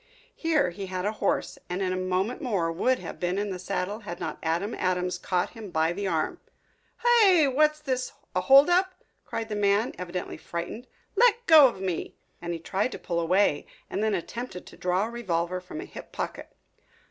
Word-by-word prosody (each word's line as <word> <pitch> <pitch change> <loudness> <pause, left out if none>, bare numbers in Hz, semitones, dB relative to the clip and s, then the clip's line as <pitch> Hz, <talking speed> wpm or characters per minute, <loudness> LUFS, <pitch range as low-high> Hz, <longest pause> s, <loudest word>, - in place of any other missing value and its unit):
Here 315 - +1
he 195 +2 -6
had 185 0 -3
a 210 - +1
horse, 215 -2 -1
and 180 +1 -2
in 185 -1 0
a - - -1
moment 185 +5 -1
more 190 -9 0
would 250 +10 +2
have - - -8
been 180 +1 -1
in 205 0 -1
the 185 - -5
saddle 195 +3 -3
had 175 -6 -7
not - - -4
Adam 170 +7 -1
Adams 180 -1 -1
caught 180 0 -1
him 220 -4 -9
by 160 0 +1
the 200 +2 -3
arm. 365 - -1 0.6
"Hi! 420 -9 +5
what's 305 +3 +3
this, 260 -4 -2 0.2
a - - +2
hold 275 +1 +7
up?" 370 +1 +2 0.3
cried 225 -1 -4
the 215 - -4
man, 205 +2 +2
evidently 180 0 -5
frightened. 175 +9 -6 0.3
"Let 475 -1 +4
go 310 - +9
of 230 -6 -5
me!" 185 -3 -3 0.3
And 170 0 -4
he 170 - -2
tried 195 +8 -1
to - - -5
pull 170 -1 -2
away 170 -2 +2 0.2
and - - -1
then 215 -2 +2
attempted 190 +1 -6
to - - -13
draw 180 +3 0
a - - -5
revolver 180 -6 -2
from 180 +12 -8
a 365 - -6
hip - - -11
pocket. - - -5
200 Hz, 200 wpm, -27 LUFS, 180-255 Hz, 0.6 s, go